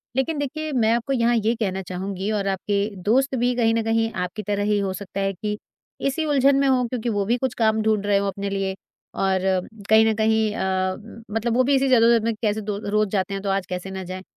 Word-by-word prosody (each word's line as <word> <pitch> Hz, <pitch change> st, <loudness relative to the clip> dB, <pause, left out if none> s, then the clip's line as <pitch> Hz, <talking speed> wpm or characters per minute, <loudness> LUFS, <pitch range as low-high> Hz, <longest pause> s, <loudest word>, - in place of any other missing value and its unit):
लेकिन 295 Hz, +4 st, 0 dB
देखिए, 310 Hz, +2 st, -3 dB
मैं 230 Hz, -5 st, +2 dB
आपको 235 Hz, +3 st, -1 dB
यहाँ 240 Hz, -1 st, +2 dB
ये 225 Hz, 0 st, +2 dB
कहना 190 Hz, -4 st, -2 dB
चाहूँगी 190 Hz, +2 st, -4 dB
और 205 Hz, -2 st, -1 dB
आप 190 Hz, -1 st, -1 dB
के 205 Hz, 0 st, +1 dB
दोस्त 265 Hz, +6 st, +2 dB
भी 245 Hz, 0 st, +1 dB
कहीं 225 Hz, -2 st, +2 dB
न 230 Hz, 0 st, +1 dB
कहीं, 225 Hz, 0 st, +1 dB
आपकी 180 Hz, +3 st, -4 dB
तरह 205 Hz, 0 st, 0 dB
ही 210 Hz, 0 st, +2 dB
हो 195 Hz, -1 st, -1 dB
सकता 195 Hz, +1 st, -6 dB
है 195 Hz, 0 st, 0 dB
कि 210 Hz, +3 st, -4 dB, 0.5 s
इसी 295 Hz, +4 st, -1 dB
उलझन 280 Hz, -2 st, +4 dB
में 275 Hz, -, +3 dB
हों 255 Hz, -2 st, +3 dB
क्योंकि 240 Hz, -1 st, -3 dB
वो 205 Hz, -3 st, 0 dB
भी 235 Hz, +4 st, +1 dB
कुछ 260 Hz, 0 st, -2 dB
काम 220 Hz, -1 st, +2 dB
ढूँढ 215 Hz, -2 st, +1 dB
रहे 205 Hz, -1 st, +3 dB
हों 200 Hz, 0 st, 0 dB
अपने 200 Hz, 0 st, -3 dB
लिए 195 Hz, -1 st, -2 dB, 0.5 s
और 190 Hz, -1 st, +2 dB, 0.5 s
कहीं 220 Hz, 0 st, +6 dB
न 220 Hz, -, +3 dB
कहीं 220 Hz, 0 st, +2 dB
अ, 185 Hz, 0 st, 0 dB, 0.4 s
मतलब 225 Hz, +2 st, -1 dB
वो 255 Hz, -, +5 dB
भी 275 Hz, +2 st, +3 dB
इसी 270 Hz, 0 st, +2 dB
जदोजहद 230 Hz, -2 st, +5 dB
में, 230 Hz, 0 st, 0 dB
कैसे 215 Hz, -1 st, 0 dB
दो 205 Hz, -1 st, -3 dB
रोज़ 210 Hz, 0 st, +1 dB
जाते 195 Hz, -1 st, -1 dB
हैं, 195 Hz, -, -3 dB
तो 200 Hz, -, -2 dB
आज 195 Hz, -1 st, 0 dB
कैसे 180 Hz, +1 st, -5 dB
ना 190 Hz, 0 st, -5 dB
जाएँ। 185 Hz, +1 st, -7 dB
215 Hz, 240 wpm, -23 LUFS, 195-235 Hz, 0.5 s, कहीं